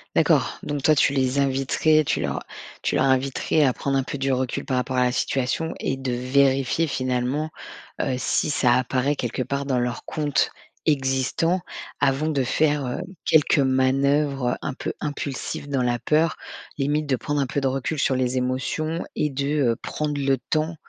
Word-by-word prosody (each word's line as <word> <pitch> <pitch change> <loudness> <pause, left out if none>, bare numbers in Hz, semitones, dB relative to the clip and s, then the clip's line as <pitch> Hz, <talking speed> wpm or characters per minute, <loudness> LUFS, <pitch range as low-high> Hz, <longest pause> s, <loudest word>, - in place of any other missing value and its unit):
D'accord, - - +3
donc 145 -1 -3
toi, 155 +3 +4
tu 140 - +3
les 130 -1 +1
inviterais, 140 +3 +2
tu - - 0
leur - - -2 0.4
tu - - 0
leur - - +3
inviterais 135 +3 +1
à 130 -3 +3
prendre 140 +2 -2
un 135 - +3
peu 135 - -5
du 135 0 0
recul 130 -1 -2
par 130 - -1
rapport 125 +1 -1
à 125 - +4
la 125 - +2
situation 135 +5 -1
et 135 - -1
de 135 -1 -3
vérifier 135 +4 +2
finalement, 130 +3 -1 0.5
heu, 130 - 0
si 130 - 0
ça 125 -4 +3
apparaît 130 +3 0
quelque 125 -1 -2
part 140 +3 -3
dans 130 -2 +1
leur 120 0 -2
compte 150 -3 0 0.4
existant 140 +5 +1 0.4
avant 135 +3 +2
de 140 -4 +1
faire, 145 +1 +1
heu, 125 - -3 0.2
quelques 150 -1 +4
manœuvres, 135 0 +2
heu, - - -2
un 140 - -2
peu - - -4
impulsives 145 -1 -4
dans 135 -3 0
la 120 -1 0
peur. 155 +4 +1 0.4
Limite, 145 +2 +1
de 140 -2 +1
prendre 145 +4 -2
un - - +1
peu 140 +1 -2
de 135 - +1
recul 135 +3 -2
sur 135 - +2
les 130 0 0
émotions 140 +6 -1
et 150 - +1
de, 140 +2 -1
heu, - - -6
prendre 150 +4 -3
le 135 -1 +2
temps, 155 +2 0
135 Hz, 185 wpm, -24 LUFS, 130-145 Hz, 0.5 s, toi